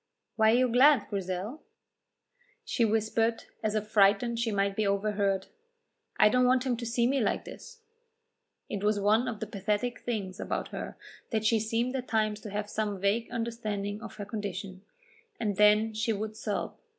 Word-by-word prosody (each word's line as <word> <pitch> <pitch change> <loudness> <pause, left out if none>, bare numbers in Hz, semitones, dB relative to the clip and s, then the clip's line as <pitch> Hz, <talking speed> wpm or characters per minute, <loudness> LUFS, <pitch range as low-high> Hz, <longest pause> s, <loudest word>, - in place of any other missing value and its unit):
"Why 220 -1 +4
are 225 - +5
you 255 +1 +4
glad, 255 +1 +5
Grizel?" 195 - -3 1.0
She 240 - 0
whispered, 225 +1 +1 0.2
as 215 -1 -1
if 215 0 -1
frightened 215 +3 +3
she 230 -1 0
might 200 -1 0
be 215 -1 +1
overheard: 200 -1 0 0.7
"I 215 - +8
don't 250 +3 +3
want 255 +1 +3
him 250 -2 +1
to 235 0 -5
see 235 +1 +1
me 270 +3 +2
like 215 - 0
this." 465 -1 -11 0.8
It 200 -1 -4
was 210 0 +2
one 215 +5 +3
of 225 -4 -4
the - - -1
pathetic 210 +4 -2
things 200 -6 -4
about - - -3
her - - -6 0.3
that 220 -2 -1
she 225 0 +4
seemed 230 +4 -1
at 255 -1 -3
times 215 -2 0
to 215 - -8
have 205 +1 -3
some 210 -2 -2
vague 200 +4 0
understanding 215 -3 -3
of - - -9
her 205 - -6
condition, 200 -3 -5 0.6
and 205 -4 -1
then 210 +1 +5
she 220 +1 0
would 215 +1 -4
sob. 215 -2 -3
215 Hz, 175 wpm, -29 LUFS, 205-235 Hz, 1.0 s, I